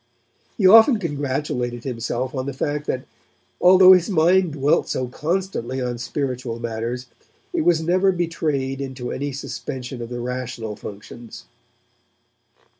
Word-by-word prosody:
He 205 - +1
often 225 +6 +8
congratulated 140 - -3
himself 125 0 -3
on 130 -1 -3
the 140 - -4
fact 145 +2 -2
that 130 - -2 0.6
although 185 +1 +8
his 180 +2 +3
mind 180 -1 +3
dwelt 145 0 +1
so 130 - -2
constantly 150 -3 -3
on 125 -2 -3
spiritual 125 -2 -3
matters 115 +2 -4 0.5
it 345 - +1
was 170 - +2
never 185 +3 +3
betrayed 155 -6 -2
into 130 -2 -5
any 145 +1 -3
suspension 130 -2 -6
of 115 - -6
the 120 0 -5
rational 120 -3 -4
functions. 105 - -10
135 Hz, 130 wpm, -22 LUFS, 125-170 Hz, 0.6 s, often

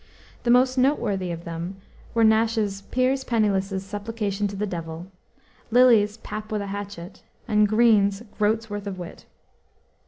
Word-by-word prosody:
The 240 - -2
most 255 +1 +4
noteworthy 205 -9 +1
of 170 -1 -5
them 170 +3 -5 0.4
were 230 - +4
Nash's 220 -2 +2
Piers 260 +1 +1
Penniless's 195 -5 0
Supplication 205 0 -3
to 200 - -7
the 205 +2 -1
Devil, 170 -1 -6 0.6
Lyly's 225 -3 +5
Pap 215 -1 -7
with 210 -1 -1
a 200 0 -5
Hatchet, 200 -3 -7 0.3
and 210 0 +3
Greene's 215 -2 +3 0.2
Groat's 220 +2 +1
Worth 205 -1 -6
of 195 -2 -5
Wit. 175 -2 -9
205 Hz, 145 wpm, -24 LUFS, 195-225 Hz, 0.6 s, Lyly's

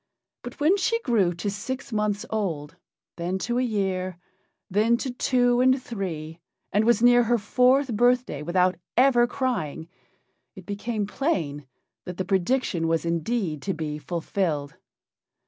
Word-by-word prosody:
But 245 - -9
when 320 +7 +4
she 460 +4 +1
grew 215 - +2
to 200 +4 -3
six 245 +4 -5
months 210 -1 0
old, 170 -9 -3 0.4
then 175 +2 -2
to 240 0 0
a - - +2
year, 190 -6 -1 0.5
then 215 +5 +2
to 260 +1 -3
two 245 -1 +2
and 260 +1 +4
three, 170 -9 -5 0.3
and 210 +2 +3
was 235 0 +3
near 245 0 +7
her 240 +1 +3
fourth 250 +4 +2
birthday 245 - +2
without 180 +2 +1 0.2
ever 245 -2 +5
crying, 230 - -2 0.7
it - - -11
became 210 +1 -3
plain 160 - -2 0.4
that 180 -1 -7
the 185 - -2
prediction 190 -2 0
was 165 0 0
indeed 170 - -1
to 195 +3 -2
be 150 -1 -4
fulfilled. 160 -3 -2
205 Hz, 145 wpm, -25 LUFS, 170-245 Hz, 0.7 s, near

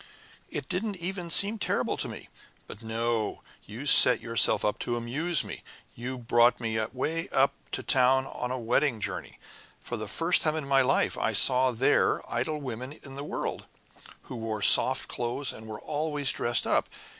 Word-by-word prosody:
It 145 - -5
didn't 200 +3 -2
even 180 0 -5
seem 205 +6 +3
terrible - - -1
to - - -2
me. - - -9 0.4
But 100 - -12
no 115 -1 -2 0.2
you 115 +8 -8
set 125 -3 +8
yourself 115 -1 +2 0.2
to 120 - -2
amuse 140 +8 0
me. - - -8 0.3
You 125 +2 -6
brought 120 0 +3
me 110 -2 -2
way 160 +6 -3
up 135 +1 +2 0.2
to - - -3
town 130 +1 +3
on 125 -2 -5
a 130 - -3
wedding 120 +1 0
journey. - - -5 0.4
For - - -6
the 110 - -6
first 165 - +2
time 155 -1 +1
in 155 -3 -4
my 135 -1 +4
life 130 +1 +1
I - - 0
saw 130 0 +3
there 130 +4 +2
idle 140 +6 -2
women 130 0 -6
in 135 - -9
the 140 +1 -7
world, - - -5 0.6
who 125 - -8
wore 110 -2 -4
soft - - +5
clothes 125 +3 -2
and 110 - -12
were 110 -1 -7
always 150 -2 -2
dressed 120 -1 +1
up. - - +1
130 Hz, 175 wpm, -27 LUFS, 120-150 Hz, 0.6 s, set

